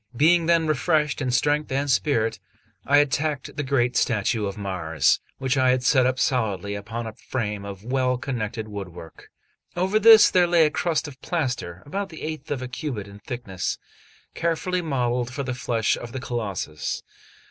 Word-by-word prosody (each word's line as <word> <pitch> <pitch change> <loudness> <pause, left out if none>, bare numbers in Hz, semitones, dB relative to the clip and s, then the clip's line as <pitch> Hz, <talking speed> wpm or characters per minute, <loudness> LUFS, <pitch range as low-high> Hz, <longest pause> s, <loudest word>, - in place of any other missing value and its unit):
Being 165 +3 +4
then 170 -1 +4
refreshed 150 -1 +1
in 130 - -1
strength 145 +4 +1
and 140 +2 0
spirits, 120 -4 +1 0.5
I 145 - +5
attacked 145 0 0
the - - -2
great 130 -3 +1
statue 110 -1 +1
of 100 - -6
Mars, 85 -7 +1 0.2
which 130 +1 0
I 130 0 +4
had 125 0 +2
set 130 -1 +4
up 130 0 0
solidly 105 - 0
upon 115 +3 -5
a 110 - -6
frame 105 -4 -4
of 100 -1 -8
well 130 0 +1
connected 115 -4 -4
woodwork. 90 -6 -9 0.5
Over 190 +4 +2
this 220 0 +8
there 180 -1 +4
lay 170 -2 +5
a 150 - +1
crust 160 -2 0
of 135 -2 -12
plaster, 125 - -3
about 195 +6 -3
the 160 - -10
eighth 155 0 -5
of 135 -3 -2
a - - -4
cubit 125 -5 -5
in 100 0 -12
thickness, 105 -6 -4 0.6
carefully 175 +2 -1
modelled 125 -5 -1
for 140 +2 -4
the 130 -1 -3
flesh 115 -3 0
of 120 -1 -8
the 130 - -3
Colossus. 100 -12 -4
130 Hz, 175 wpm, -24 LUFS, 110-150 Hz, 0.6 s, this